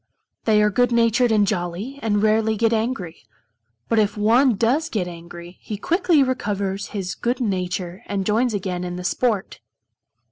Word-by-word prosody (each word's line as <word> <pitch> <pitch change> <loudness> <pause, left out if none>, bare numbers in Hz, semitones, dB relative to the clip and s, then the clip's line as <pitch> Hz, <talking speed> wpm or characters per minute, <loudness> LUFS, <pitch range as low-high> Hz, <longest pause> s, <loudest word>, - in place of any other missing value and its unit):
They 215 -1 +4
are 210 - +3
good 245 +4 +2
natured 235 +1 +3
and 210 -2 +4
jolly, 190 +9 -3
and 205 -2 0
rarely 220 0 +2
get 230 +1 +2
angry. 220 -7 -2 0.7
But 225 - +2
if 210 0 +1
one 235 +4 +4
does 250 +10 +1
get 190 -5 -2
angry, 170 +1 -10
he 210 - -5
quickly 335 - +2
recovers 200 -6 -2
his 195 -3 -4
good 245 +1 -2
nature 185 -4 -2
and 195 -1 -2
joins 225 +2 +1
again 180 -2 -3
in 180 0 -4
the 180 - -6
sport. 215 +1 -1
210 Hz, 165 wpm, -22 LUFS, 185-235 Hz, 0.7 s, They